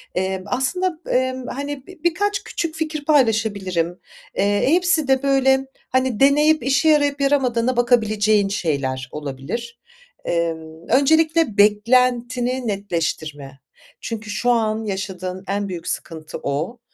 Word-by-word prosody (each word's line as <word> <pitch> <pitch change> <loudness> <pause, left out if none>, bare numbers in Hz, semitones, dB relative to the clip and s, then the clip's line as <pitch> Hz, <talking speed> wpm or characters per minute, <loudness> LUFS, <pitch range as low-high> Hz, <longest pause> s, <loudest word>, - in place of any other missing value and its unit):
Emm, 190 +1 -1
aslında, 320 - -1
emm, 260 0 0
hani, 280 +1 -5
bi 370 -4 -14
birkaç 395 +4 0
küçük 325 -2 -4
fikir 310 -2 -4
paylaşabilirim. 205 - +1 0.4
Eee, 205 +1 +2
hepsi 350 -4 +2
de 265 0 +2
böyle, 270 -1 +3 0.2
hani, 260 -3 0
deneyip 295 +1 +4
işe 275 +4 +3
yarayıp 290 -2 +2
yaramadığına 255 -3 +1
bakabileceğin 215 -4 +3
şeyler 135 -9 -2
olabilir. 150 - -6 0.5
Emm, 160 -1 -3
öncelikle 315 -1 +3
beklentini 245 +3 +2
netleştirme. 155 -8 -3 0.4
Çünkü 220 -2 -6
şu 240 +4 -1
an 220 -2 0
yaşadığın 190 -2 -4
en 200 0 -1
büyük 170 -2 -6
sıkıntı 160 -2 -5
o. 155 - -3
235 Hz, 115 wpm, -21 LUFS, 190-275 Hz, 0.5 s, deneyip